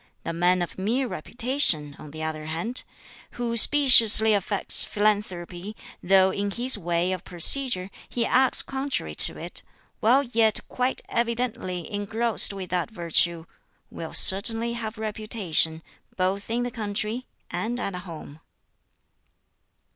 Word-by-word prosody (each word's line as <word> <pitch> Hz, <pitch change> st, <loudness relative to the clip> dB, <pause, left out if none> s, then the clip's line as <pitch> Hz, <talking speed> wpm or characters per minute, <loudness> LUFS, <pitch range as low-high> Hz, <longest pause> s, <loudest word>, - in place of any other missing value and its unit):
The 165 Hz, -, -5 dB
man 175 Hz, +1 st, 0 dB
of 175 Hz, -, -9 dB
mere 240 Hz, +7 st, -2 dB
reputation, 185 Hz, -, 0 dB
on 150 Hz, -, -12 dB
the 155 Hz, +2 st, -9 dB
other 155 Hz, -1 st, -6 dB
hand, 195 Hz, +11 st, -4 dB, 0.5 s
who 235 Hz, -1 st, -4 dB
speciously 230 Hz, -5 st, +7 dB
affects 205 Hz, 0 st, +1 dB
philanthropy, 205 Hz, -2 st, -3 dB, 0.3 s
though 190 Hz, +1 st, +2 dB
in 200 Hz, +1 st, -4 dB
his 245 Hz, +6 st, +2 dB
way 175 Hz, -2 st, -2 dB
of 185 Hz, -1 st, -5 dB
procedure 190 Hz, -, +1 dB, 0.2 s
he 235 Hz, -2 st, -2 dB
acts 260 Hz, 0 st, +3 dB
contrary 270 Hz, 0 st, -5 dB
to -, -, +6 dB
it, -, -, -5 dB, 0.4 s
while 255 Hz, +6 st, +2 dB
yet 230 Hz, -4 st, +1 dB
quite 255 Hz, +1 st, -3 dB
evidently 235 Hz, -7 st, -4 dB
engrossed 220 Hz, +3 st, 0 dB
with 190 Hz, -3 st, -9 dB
that 180 Hz, +1 st, -2 dB
virtue 170 Hz, -3 st, -1 dB, 0.5 s
will 165 Hz, -, -7 dB
certainly 225 Hz, +4 st, +4 dB
have 225 Hz, -2 st, -7 dB
reputation, 210 Hz, -7 st, -2 dB, 0.3 s
both 190 Hz, +3 st, -3 dB
in 235 Hz, +2 st, -2 dB
the 245 Hz, -, -5 dB
country 215 Hz, +2 st, -5 dB, 0.2 s
and 240 Hz, +2 st, -4 dB
at 200 Hz, -, -5 dB
home." 165 Hz, -4 st, -11 dB
205 Hz, 130 wpm, -23 LUFS, 180-235 Hz, 0.5 s, speciously